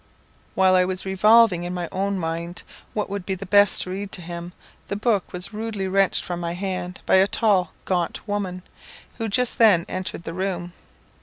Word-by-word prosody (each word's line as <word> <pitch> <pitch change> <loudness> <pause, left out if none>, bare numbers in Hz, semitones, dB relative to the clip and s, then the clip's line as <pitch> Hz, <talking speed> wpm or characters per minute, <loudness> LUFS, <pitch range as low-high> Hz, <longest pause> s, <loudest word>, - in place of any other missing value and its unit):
While 190 -1 +4
I 185 0 +5
was 185 +1 -2
revolving 200 -1 +5
in 175 +1 -4
my 175 -1 -3
own 195 +1 -1
mind 170 0 -4 0.3
what 210 - -1
would 200 -1 -4
be 190 +1 -2
the 195 +2 -8
best 205 +1 +4
to 185 - -7
read 195 +1 -5
to 180 - -5
him, 170 +1 -7 0.4
the 200 - -3
book 210 -2 0
was 180 +4 -3
rudely 210 -3 -3
wrenched 195 0 +2
from 175 -1 -4
my 170 -1 -3
hand 185 -1 -4
by - - +5
a 190 +1 +5
tall, 200 -6 +1
gaunt 180 +2 -2
woman, 190 -3 -3 0.6
who 225 - -1
just 245 +4 0
then 200 -7 +5
entered 185 -2 -5
the 165 - -6
room. 180 -1 -3
190 Hz, 190 wpm, -23 LUFS, 180-200 Hz, 0.6 s, I